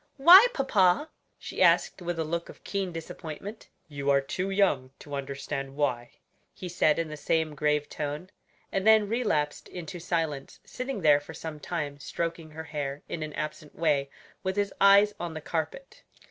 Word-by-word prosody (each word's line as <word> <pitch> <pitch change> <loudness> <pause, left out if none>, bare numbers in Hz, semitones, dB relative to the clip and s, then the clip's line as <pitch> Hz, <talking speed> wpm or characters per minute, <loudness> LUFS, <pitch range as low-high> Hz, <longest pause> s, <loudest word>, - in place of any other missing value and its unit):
"Why, 360 - +10
papa?" 235 - +2 0.3
she - - -6
asked - - +4
with 175 -1 -3
a 165 - 0
look 170 +2 -3
of - - -13
keen 195 -2 -2
disappointment. 165 +5 -8 0.2
"You 140 -2 -3
are 140 0 +5
too 180 +8 -3
young 190 -10 +2
to 145 - -11
understand 135 0 -4
why," 125 -5 -1 0.4
he 185 - -7
said 155 -3 +2
in 165 -1 -1
the 155 - -6
same 160 +1 0
grave 150 0 +1
tone, 150 +5 -5 0.4
and 195 +2 -1
then 220 -1 +6
relapsed 200 -11 -1
into 175 -1 -7
silence; 160 -5 -3
sitting 255 -4 -5
there 150 -3 +6
for 160 +2 -11
some 160 -2 -7
time 145 -3 -4
stroking 165 +1 -4
her 160 +1 -8
hair 145 -3 -5
in 165 - -5
an 155 -1 -5
absent 150 0 -6
way, 145 -4 +1 0.3
with 190 0 -2
his 205 -1 0
eyes 200 +1 +7
on 170 -2 -4
the - - -4
carpet. 160 - -4
160 Hz, 175 wpm, -28 LUFS, 145-190 Hz, 0.4 s, Why